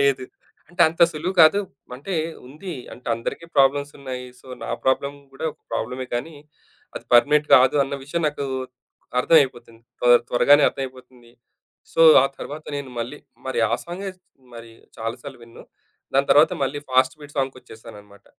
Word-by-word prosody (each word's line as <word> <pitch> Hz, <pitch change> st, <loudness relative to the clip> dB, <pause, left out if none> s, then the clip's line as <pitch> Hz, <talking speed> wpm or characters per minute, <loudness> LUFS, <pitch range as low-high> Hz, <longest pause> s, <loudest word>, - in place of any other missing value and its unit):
లేదు. 135 Hz, -2 st, +2 dB, 0.4 s
అంటే 175 Hz, 0 st, -10 dB
అంత 165 Hz, +1 st, 0 dB
సులువు 170 Hz, +5 st, -3 dB
కాదు 160 Hz, +6 st, +6 dB, 0.3 s
అంటే 145 Hz, +9 st, -7 dB, 0.3 s
ఉంది 160 Hz, +7 st, -8 dB, 0.2 s
అంటే 125 Hz, -, -14 dB
అందరికీ 115 Hz, +8 st, -5 dB
ప్రాబ్లమ్స్ 140 Hz, +1 st, +3 dB
ఉన్నాయి. 130 Hz, -2 st, -6 dB
సో, -, -, -21 dB, 0.2 s
నా -, -, -6 dB, 0.2 s
ప్రాబ్లమ్ 140 Hz, +2 st, 0 dB, 0.2 s
కూడా 135 Hz, -, -7 dB
ఒక -, -, -33 dB
ప్రాబ్లమే 125 Hz, +3 st, -4 dB
కానీ, 155 Hz, +6 st, -4 dB, 0.6 s
అది -, -, -7 dB
పర్మినెంట్ 150 Hz, +4 st, +5 dB
కాదు 130 Hz, +1 st, +4 dB
అన్న 140 Hz, +1 st, -5 dB
విషయం 170 Hz, +4 st, -3 dB
నాకు 145 Hz, -1 st, -5 dB, 0.8 s
అర్థమైపోతుంది. 125 Hz, -7 st, +1 dB, 0.2 s
త్వర 120 Hz, 0 st, +6 dB, 0.2 s
త్వరగానే 145 Hz, +4 st, +5 dB
అర్థమైపోతుంది. 130 Hz, -2 st, -9 dB, 0.6 s
సో, -, -, -1 dB, 0.2 s
ఆ -, -, +3 dB
తర్వాత 150 Hz, +2 st, -8 dB
నేను 140 Hz, -2 st, -6 dB
మళ్ళీ 125 Hz, +6 st, -5 dB, 0.3 s
మరి 130 Hz, -3 st, -1 dB
ఆ -, -, -1 dB
సాంగే 190 Hz, +3 st, -6 dB, 0.4 s
మరి 115 Hz, 0 st, -11 dB, 0.3 s
చాలా 115 Hz, +1 st, -3 dB
సార్లు -, -, -10 dB
వినను. 115 Hz, 0 st, -14 dB, 0.5 s
దాని 140 Hz, +1 st, +2 dB
తర్వాత 150 Hz, +2 st, +6 dB
మళ్ళీ 135 Hz, +2 st, -1 dB
ఫాస్ట్ 130 Hz, +2 st, +3 dB
బీట్ 145 Hz, 0 st, -13 dB
సాంగ్ 135 Hz, -1 st, -2 dB
వచ్చేశాననమాట. 105 Hz, -2 st, -14 dB
135 Hz, 155 wpm, -22 LUFS, 125-150 Hz, 0.8 s, కాదు